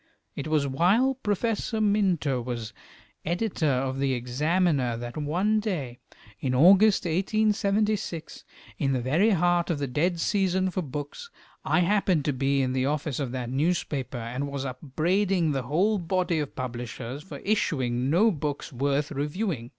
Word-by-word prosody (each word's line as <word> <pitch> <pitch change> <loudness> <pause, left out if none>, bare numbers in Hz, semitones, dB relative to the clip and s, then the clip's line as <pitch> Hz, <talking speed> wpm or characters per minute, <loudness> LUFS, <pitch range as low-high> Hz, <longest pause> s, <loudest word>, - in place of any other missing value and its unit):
It 140 - -4
was 155 -2 +1
while 185 - +3
Professor 225 -1 -1
W. 215 -2 +3
Minto 175 -11 +1
was 115 -2 -5 0.5
editor 175 0 -1
of 130 0 -1
the 135 -1 +1
"Examiner," 135 +1 0
that 120 0 -7
one 180 +9 +1
day 150 - -3 0.4
in 130 +2 -1
August, 190 +8 +6
1876, 205 0 0 0.4
in 135 -2 +1
the 130 - 0
very 160 - +3
heart 175 -3 +2
of 165 - 0
the 145 - -2
dead 165 +7 0
season 190 0 +1
for 185 - -2
books, 145 - -6 0.3
I 180 - +2
happened 185 -5 +2
to 145 - +1
be 135 +1 +1
in 130 0 -1
the 130 0 +1
office 150 -1 -2
of 135 -4 -2
that 125 -2 -4
newspaper, 135 -3 -1
and 120 +4 -4
was 140 -1 -3
upbraiding 165 +7 0
the 135 -2 -1
whole 200 +8 +2
body 180 -1 0
of 145 -2 -4
publishers 125 +1 -5
for 190 - -9
issuing 130 - 0
no 205 +9 +4
books 145 -4 -4
worth 140 +3 0
reviewing. 150 - -3
155 Hz, 155 wpm, -26 LUFS, 135-190 Hz, 0.5 s, August